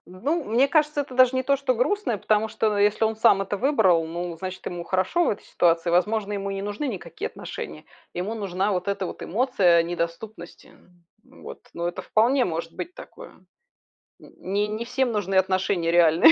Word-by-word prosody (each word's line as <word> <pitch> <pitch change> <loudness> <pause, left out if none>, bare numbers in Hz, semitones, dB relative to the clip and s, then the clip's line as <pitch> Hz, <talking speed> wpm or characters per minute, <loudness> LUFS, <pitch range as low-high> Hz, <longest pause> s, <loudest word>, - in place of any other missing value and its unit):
Ну, 275 - -2
мне 245 +6 +2
кажется, 300 -1 +2
это 275 -2 -6
даже 255 0 +5
не 260 - +1
то, 275 +2 +2
что 265 -2 0
грустное, 250 - 0
потому 215 +2 +1
что, 215 -1 0
э, 205 - +5
если 210 +2 +2
он 220 0 0
сам 215 -3 +4
это 200 +1 -3
выбрал, 205 - +3
ну, 170 0 -5
значит, 185 +1 -7
ему 175 -1 -5
хорошо 190 - +1
в - - +2
этой 205 - -4
ситуации. 170 0 +1
Возможно, 205 +4 +1
ему 200 -1 -3
и - - -3
не 195 - -4
нужны 205 +8 -3
никакие 205 -8 -5
отношения: 75 0 -8 0.3
ему 190 +6 -3
нужна 200 -1 -1
вот 180 +1 -2
эта 195 -2 -1
вот - - -8
эмоция, 190 -6 +3
э, - - +3
недоступности. 175 +3 -6
М, 175 +4 -23
вот. - - -9
Но 170 0 -2
это 175 - -6
вполне 245 +4 +2
может 165 -1 -4
быть 350 +2 -6
такое. - - -12 0.9
Н - - -16
не 200 +3 -1
не 215 +2 -4
всем 250 0 0
нужны 195 -3 -2
отношения 185 -2 +1
реальные. 165 -1 +6
200 Hz, 200 wpm, -24 LUFS, 175-240 Hz, 0.9 s, реальные